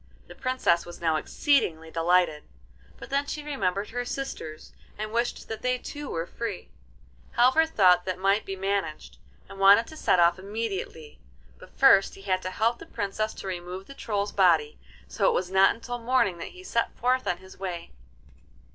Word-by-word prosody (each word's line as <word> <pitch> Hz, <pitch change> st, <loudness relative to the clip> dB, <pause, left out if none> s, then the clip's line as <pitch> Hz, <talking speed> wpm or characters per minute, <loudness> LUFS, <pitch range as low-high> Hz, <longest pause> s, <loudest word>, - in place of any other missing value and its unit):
The -, -, -12 dB
Princess 255 Hz, -10 st, +1 dB
was 175 Hz, -, -11 dB
now 165 Hz, -2 st, +1 dB
exceedingly 160 Hz, -, 0 dB
delighted, 165 Hz, -2 st, +2 dB, 0.6 s
but -, -, -11 dB
then 280 Hz, +1 st, 0 dB
she 300 Hz, -, -4 dB
remembered 200 Hz, -9 st, -2 dB
her 245 Hz, +1 st, -2 dB
sisters, 245 Hz, -, -6 dB, 0.2 s
and 215 Hz, 0 st, -4 dB
wished 235 Hz, +1 st, -2 dB
that 220 Hz, -1 st, -6 dB
they 250 Hz, 0 st, +1 dB
too 290 Hz, +3 st, -7 dB
were 165 Hz, 0 st, -2 dB
free. 220 Hz, -1 st, -6 dB, 0.7 s
Halvor 260 Hz, +7 st, +5 dB
thought 180 Hz, -, +4 dB
that 185 Hz, -1 st, -2 dB
might 195 Hz, +3 st, +2 dB
be 195 Hz, -, -5 dB
managed, 195 Hz, -4 st, -3 dB, 0.3 s
and 195 Hz, -, -11 dB
wanted 200 Hz, +4 st, +7 dB
to 315 Hz, -, -12 dB
set 185 Hz, -, +2 dB
off 175 Hz, +1 st, +4 dB
immediately; 195 Hz, -6 st, -5 dB, 0.4 s
but -, -, -16 dB
first 195 Hz, 0 st, +5 dB
he 195 Hz, -, -14 dB
had 185 Hz, -2 st, 0 dB
to 185 Hz, -, -4 dB
help 230 Hz, +5 st, 0 dB
the -, -, -11 dB
Princess 215 Hz, 0 st, -3 dB
to -, -, -8 dB
remove 180 Hz, +1 st, -6 dB
the 275 Hz, -, -11 dB
Troll's 205 Hz, -6 st, -2 dB
body, 165 Hz, -6 st, +3 dB, 0.3 s
so 200 Hz, -, 0 dB
it -, -, +1 dB
was 180 Hz, 0 st, -1 dB
not 190 Hz, 0 st, +5 dB
until 245 Hz, +1 st, -6 dB
morning 230 Hz, -7 st, +1 dB
that -, -, -5 dB
he 370 Hz, -, -11 dB
set 235 Hz, -11 st, -1 dB
forth 255 Hz, +2 st, +1 dB
on 175 Hz, -, 0 dB
his 190 Hz, +1 st, -15 dB
way. 180 Hz, -3 st, -5 dB
195 Hz, 180 wpm, -27 LUFS, 180-235 Hz, 0.7 s, wanted